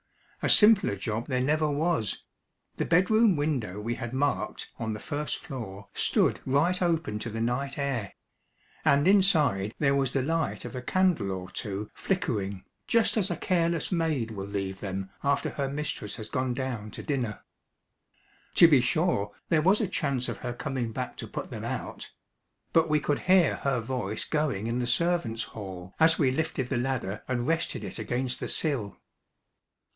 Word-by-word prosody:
A -, -, +1 dB
simpler 210 Hz, -, +6 dB
job 110 Hz, +4 st, -3 dB
there 130 Hz, -3 st, 0 dB
never 155 Hz, +2 st, +2 dB
was. 145 Hz, -, 0 dB, 0.5 s
The -, -, 0 dB
bedroom 195 Hz, +4 st, +4 dB
window 135 Hz, -10 st, -1 dB
we 115 Hz, +3 st, -2 dB
had 120 Hz, -1 st, -5 dB
marked 140 Hz, +2 st, -1 dB
on 110 Hz, -1 st, -2 dB
the -, -, -7 dB
first 150 Hz, +5 st, -3 dB
floor 110 Hz, -, -8 dB
stood -, -, +2 dB
right 160 Hz, +8 st, +2 dB
open 165 Hz, -11 st, 0 dB
to 115 Hz, -, -4 dB
the 115 Hz, +1 st, -4 dB
night 125 Hz, +4 st, -1 dB
air; 135 Hz, -8 st, -2 dB, 0.7 s
and 140 Hz, +3 st, +4 dB
inside 155 Hz, -, +3 dB
there 140 Hz, -2 st, +3 dB
was 135 Hz, -2 st, +1 dB
the 135 Hz, -, +1 dB
light 165 Hz, +3 st, -1 dB
of -, -, -7 dB
a 125 Hz, -, -3 dB
candle 180 Hz, -, +1 dB
or 95 Hz, 0 st, -5 dB
two 105 Hz, -1 st, -4 dB
flickering, 100 Hz, -, -2 dB, 0.2 s
just 230 Hz, -1 st, +3 dB
as 205 Hz, -3 st, +1 dB
a -, -, -1 dB
careless 170 Hz, -3 st, 0 dB
maid 155 Hz, -10 st, 0 dB
will 100 Hz, -2 st, -5 dB
leave 95 Hz, -1 st, -3 dB
them 95 Hz, -1 st, -4 dB
after 140 Hz, 0 st, +1 dB
her 140 Hz, -2 st, -2 dB
mistress 140 Hz, -8 st, -3 dB
has 110 Hz, -1 st, -7 dB
gone 130 Hz, -1 st, -1 dB
down 125 Hz, -5 st, -3 dB
to -, -, -8 dB
dinner. 125 Hz, -7 st, -2 dB, 1.1 s
To 170 Hz, -, +9 dB
be 145 Hz, -6 st, +6 dB
sure 125 Hz, -, +1 dB, 0.2 s
there 160 Hz, -2 st, +4 dB
was 190 Hz, +6 st, +4 dB
a 215 Hz, -, +1 dB
chance 140 Hz, -8 st, -1 dB
of -, -, -4 dB
her 120 Hz, -1 st, -4 dB
coming 120 Hz, -2 st, -3 dB
back 125 Hz, +2 st, -4 dB
to -, -, -6 dB
put -, -, -6 dB
them -, -, -6 dB
out; -, -, -5 dB, 0.6 s
but 165 Hz, -1 st, +4 dB
we 150 Hz, 0 st, +3 dB
could 145 Hz, 0 st, 0 dB
hear 185 Hz, -4 st, +4 dB
her 135 Hz, -3 st, 0 dB
voice 110 Hz, -3 st, -3 dB
going 150 Hz, -10 st, -1 dB
in 115 Hz, +2 st, -1 dB
the 120 Hz, -, -1 dB
servants' 125 Hz, -5 st, +1 dB
hall 95 Hz, -3 st, -8 dB
as 160 Hz, +1 st, +5 dB
we 135 Hz, -5 st, +3 dB
lifted 135 Hz, -3 st, -2 dB
the 130 Hz, -, 0 dB
ladder 120 Hz, -6 st, -2 dB
and 120 Hz, -2 st, -1 dB
rested 165 Hz, +2 st, -1 dB
it -, -, -6 dB
against 125 Hz, 0 st, -2 dB
the -, -, -3 dB
sill. 130 Hz, -11 st, -1 dB
130 Hz, 175 wpm, -28 LUFS, 110-160 Hz, 1.1 s, To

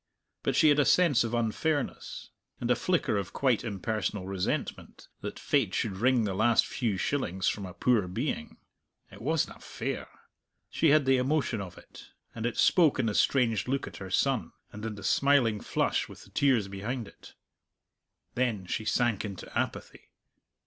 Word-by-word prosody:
But 135 Hz, -, 0 dB
she 155 Hz, +2 st, +6 dB
had 145 Hz, 0 st, +4 dB
a -, -, +6 dB
sense 170 Hz, -10 st, +4 dB
of 115 Hz, 0 st, -2 dB
unfairness, 130 Hz, +6 st, -2 dB, 0.3 s
and 120 Hz, 0 st, -1 dB
a -, -, +5 dB
flicker 170 Hz, -, 0 dB
of 100 Hz, -3 st, -4 dB
quite 130 Hz, -5 st, +1 dB
impersonal 105 Hz, -2 st, -3 dB
resentment, 95 Hz, -1 st, -4 dB
that -, -, -6 dB
fate -, -, +1 dB
should 100 Hz, -4 st, -1 dB
wring 125 Hz, +2 st, +3 dB
the 100 Hz, -3 st, -1 dB
last 110 Hz, +4 st, +3 dB
few 110 Hz, -6 st, -2 dB
shillings 95 Hz, -6 st, -1 dB
from 100 Hz, -2 st, -1 dB
a 90 Hz, -, -10 dB
poor 115 Hz, -7 st, +2 dB
being. 110 Hz, -, -3 dB, 0.5 s
It -, -, -12 dB
wasna 155 Hz, +5 st, -1 dB
fair. -, -, -5 dB, 0.6 s
She 160 Hz, -, +3 dB
had 150 Hz, -1 st, +5 dB
the 135 Hz, 0 st, +4 dB
emotion 130 Hz, -4 st, 0 dB
of 90 Hz, -3 st, -8 dB
it; -, -, -15 dB, 0.2 s
and 115 Hz, 0 st, -2 dB
it 120 Hz, -, -4 dB
spoke 165 Hz, -6 st, +4 dB
in 130 Hz, -, +1 dB
the 110 Hz, -, 0 dB
strange 115 Hz, -3 st, +2 dB
look 135 Hz, +1 st, -1 dB
at -, -, -9 dB
her 95 Hz, -2 st, -7 dB
son, 115 Hz, -3 st, 0 dB, 0.2 s
and 105 Hz, -, -9 dB
in 110 Hz, -1 st, -4 dB
the 100 Hz, -, -10 dB
smiling 125 Hz, -1 st, +3 dB
flush -, -, 0 dB
with -, -, -12 dB
the -, -, -18 dB
tears 130 Hz, -8 st, +2 dB
behind 105 Hz, +4 st, -4 dB
it. -, -, -16 dB, 1.0 s
Then 115 Hz, -7 st, -1 dB
she 110 Hz, +4 st, -3 dB
sank 120 Hz, -3 st, +1 dB
into 100 Hz, -3 st, -8 dB
apathy. -, -, -4 dB
115 Hz, 175 wpm, -29 LUFS, 100-135 Hz, 1.0 s, she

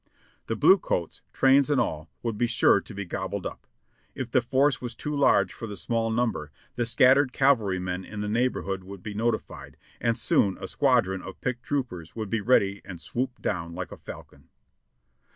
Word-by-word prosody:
The 115 Hz, -, -1 dB
blue 180 Hz, -, +6 dB
coats, 85 Hz, -, -3 dB
trains 135 Hz, +1 st, +4 dB
and 145 Hz, -3 st, +3 dB
all, 80 Hz, +1 st, -2 dB
would 115 Hz, -2 st, -2 dB
be 120 Hz, +3 st, +1 dB
sure 115 Hz, 0 st, +4 dB
to -, -, -11 dB
be 100 Hz, 0 st, -4 dB
gobbled 95 Hz, +2 st, -4 dB
up. -, -, -7 dB, 0.5 s
If 130 Hz, -3 st, -5 dB
the 130 Hz, -, +4 dB
force 135 Hz, +3 st, +2 dB
was 120 Hz, -2 st, -5 dB
too 150 Hz, +4 st, -4 dB
large 140 Hz, -, +3 dB
for 115 Hz, -, -7 dB
the 105 Hz, -, -6 dB
small 115 Hz, +3 st, -1 dB
number, 110 Hz, -10 st, -1 dB, 0.2 s
the 120 Hz, -1 st, 0 dB
scattered 130 Hz, +3 st, +5 dB
cavalrymen 95 Hz, -9 st, +1 dB
in 105 Hz, +2 st, -8 dB
the 105 Hz, -, -2 dB
neighborhood 105 Hz, -4 st, -1 dB
would 95 Hz, -1 st, -10 dB
be 105 Hz, -, -5 dB
notified, 115 Hz, +3 st, -3 dB, 0.2 s
and 115 Hz, 0 st, +1 dB
soon 100 Hz, -4 st, +2 dB
a 95 Hz, -, -6 dB
squadron 120 Hz, -10 st, +2 dB
of 95 Hz, -, -10 dB
picked 125 Hz, -1 st, -3 dB
troopers 115 Hz, -, -4 dB
would 110 Hz, -3 st, -5 dB
be 115 Hz, -2 st, 0 dB
ready 100 Hz, -4 st, +2 dB
and 90 Hz, -3 st, -9 dB
swoop 125 Hz, +7 st, -4 dB
down 85 Hz, -4 st, -2 dB
like 90 Hz, 0 st, -5 dB
a -, -, -8 dB
falcon. -, -, -12 dB
115 Hz, 190 wpm, -26 LUFS, 95-125 Hz, 0.5 s, blue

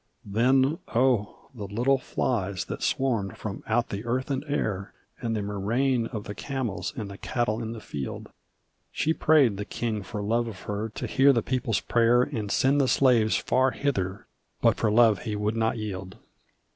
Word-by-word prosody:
Then 130 Hz, -, +2 dB, 0.2 s
oh, 120 Hz, -2 st, +1 dB
the 105 Hz, -5 st, -6 dB
little 125 Hz, +7 st, +2 dB
flies 100 Hz, -8 st, -2 dB
that -, -, -6 dB
swarmed 115 Hz, -8 st, 0 dB
from 100 Hz, -3 st, -6 dB
out 115 Hz, +2 st, +1 dB
the 100 Hz, +1 st, -4 dB
earth 130 Hz, +4 st, -2 dB
and 135 Hz, 0 st, -1 dB
air! 105 Hz, -9 st, -2 dB, 0.2 s
And 115 Hz, -2 st, -2 dB
the 105 Hz, -, -2 dB
murrain 115 Hz, +5 st, 0 dB
of 110 Hz, -4 st, -6 dB
the 105 Hz, -, -6 dB
camels, 130 Hz, -5 st, -3 dB
and 100 Hz, -5 st, -7 dB
cattle 120 Hz, -2 st, -1 dB
in 115 Hz, 0 st, -4 dB
the 115 Hz, -, -7 dB
field! 70 Hz, -9 st, -6 dB, 0.6 s
She 160 Hz, -, +1 dB
prayed 145 Hz, -11 st, +4 dB
the 105 Hz, -, -3 dB
king 110 Hz, -1 st, -3 dB
for 105 Hz, +2 st, -5 dB
love 115 Hz, +3 st, +1 dB
of 100 Hz, -4 st, -8 dB
her 105 Hz, +2 st, -3 dB
to 110 Hz, -, -6 dB
hear 135 Hz, +2 st, +5 dB
the 115 Hz, -5 st, +1 dB
people's 125 Hz, -3 st, 0 dB
prayer 120 Hz, +1 st, +3 dB
And 105 Hz, -4 st, -4 dB
send 140 Hz, +2 st, +3 dB
the 135 Hz, -, +2 dB
slaves 120 Hz, -3 st, +4 dB
far 130 Hz, +1 st, +2 dB
hither; 100 Hz, -10 st, -2 dB, 0.3 s
but -, -, +4 dB
for 110 Hz, -, +1 dB
love 110 Hz, -2 st, +5 dB
he 105 Hz, +1 st, -4 dB
would 105 Hz, +1 st, -1 dB
not 115 Hz, +1 st, +1 dB
yield. 95 Hz, -4 st, -6 dB
115 Hz, 180 wpm, -27 LUFS, 105-130 Hz, 0.6 s, hear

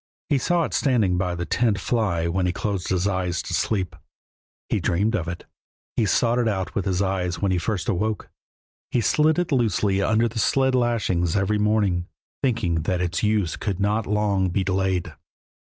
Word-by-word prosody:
He 145 Hz, -3 st, +3 dB
saw 175 Hz, +5 st, +1 dB
it -, -, -4 dB
standing 110 Hz, -10 st, +2 dB
by 90 Hz, -1 st, -1 dB
the 85 Hz, 0 st, -3 dB
tent 110 Hz, +2 st, +1 dB
fly 95 Hz, -9 st, 0 dB
when 90 Hz, +1 st, 0 dB
he -, -, +1 dB
closed 95 Hz, 0 st, -3 dB
his 95 Hz, 0 st, +1 dB
eyes 90 Hz, -3 st, -1 dB
to -, -, -6 dB
sleep; 95 Hz, -5 st, -1 dB, 0.7 s
he -, -, 0 dB
dreamed 100 Hz, +6 st, +1 dB
of 85 Hz, -5 st, -2 dB
it; 85 Hz, 0 st, -6 dB, 0.5 s
he 110 Hz, -, +2 dB
sought 120 Hz, +5 st, +2 dB
it 120 Hz, -, +1 dB
out 95 Hz, -4 st, -2 dB
with 100 Hz, -, -2 dB
his 95 Hz, 0 st, +1 dB
eyes 95 Hz, -2 st, -1 dB
when 100 Hz, -2 st, +1 dB
he 90 Hz, -, +1 dB
first 90 Hz, -1 st, -2 dB
awoke. 105 Hz, +3 st, -1 dB, 0.6 s
He -, -, +1 dB
slid 155 Hz, +7 st, +3 dB
it 175 Hz, -2 st, -1 dB
loosely 105 Hz, -, +1 dB
under 110 Hz, +3 st, +2 dB
the 115 Hz, 0 st, -5 dB
sled 130 Hz, +5 st, +2 dB
lashings 110 Hz, -9 st, +1 dB
every 105 Hz, +2 st, +1 dB
morning, 105 Hz, -5 st, +1 dB, 0.3 s
thinking 110 Hz, -, 0 dB
that 90 Hz, +2 st, -1 dB
its 90 Hz, 0 st, -1 dB
use 105 Hz, -6 st, +1 dB
could 100 Hz, -4 st, -3 dB
not 105 Hz, +2 st, 0 dB
long 100 Hz, -2 st, +1 dB
be 95 Hz, +2 st, 0 dB
delayed. 95 Hz, -1 st, -1 dB
100 Hz, 190 wpm, -24 LUFS, 90-110 Hz, 0.7 s, He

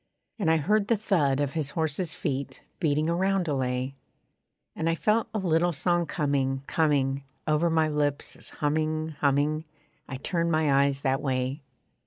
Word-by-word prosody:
And 195 Hz, -, +1 dB
I 160 Hz, -, +4 dB
heard 200 Hz, +7 st, +1 dB
the 230 Hz, -, +3 dB
thud 160 Hz, -10 st, +1 dB
of 145 Hz, -2 st, -1 dB
his 155 Hz, -4 st, -1 dB
horse's 160 Hz, +1 st, -1 dB
feet 140 Hz, -5 st, -4 dB, 0.2 s
Beating 155 Hz, -2 st, +1 dB
a 170 Hz, -, +1 dB
roundelay. 140 Hz, -9 st, 0 dB, 0.8 s
And 160 Hz, -, 0 dB
I 165 Hz, -, +2 dB
felt 215 Hz, +6 st, +1 dB
a 215 Hz, -, -2 dB
little 175 Hz, -2 st, +2 dB
song 175 Hz, +2 st, +1 dB
coming, 135 Hz, -3 st, 0 dB
coming 140 Hz, -4 st, +1 dB, 0.2 s
Over 155 Hz, +2 st, +2 dB
my 160 Hz, -1 st, +3 dB
lips 145 Hz, -2 st, -1 dB
as -, -, -9 dB
humming, 155 Hz, +1 st, -1 dB
humming, 145 Hz, +2 st, +2 dB, 0.5 s
I 135 Hz, -, -4 dB
turned 170 Hz, +4 st, -1 dB
my 145 Hz, -3 st, +3 dB
eyes 140 Hz, -1 st, -1 dB
that 135 Hz, -1 st, +1 dB
way. 130 Hz, +1 st, -1 dB
155 Hz, 160 wpm, -27 LUFS, 140-170 Hz, 0.8 s, I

